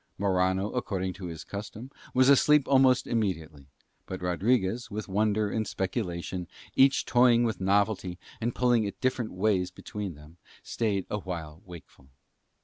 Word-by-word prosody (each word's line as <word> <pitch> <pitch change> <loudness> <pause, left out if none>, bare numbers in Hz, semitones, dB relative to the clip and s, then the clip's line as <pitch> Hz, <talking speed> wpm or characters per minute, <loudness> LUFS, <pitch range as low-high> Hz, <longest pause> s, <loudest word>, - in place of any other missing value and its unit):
Morano, 95 +1 +1
according 95 -6 -2
to 95 -1 -7
his 80 -2 -7
custom, 105 +5 -8 0.2
was 130 0 +4
asleep 140 +1 +5
almost 130 -2 +4
immediately; 80 - -3 0.4
but 95 - -5
Rodriguez, 100 +5 0
with 105 0 -5
wonder 105 +1 +1
and 110 -1 -1
speculation 90 -3 -3 0.3
each 135 +1 +4
toying 120 -1 +4
with 110 -4 -2
novelty 95 -2 +1 0.2
and 120 +1 -1
pulling 120 -2 +3
it 100 - -5
different 125 -3 -1
ways 95 -1 +1
between 95 -1 -7
them, 75 +3 -16 0.3
stayed 105 -5 -1
awhile 85 -6 -5
wakeful. 80 -6 -13
100 Hz, 140 wpm, -28 LUFS, 90-115 Hz, 0.4 s, asleep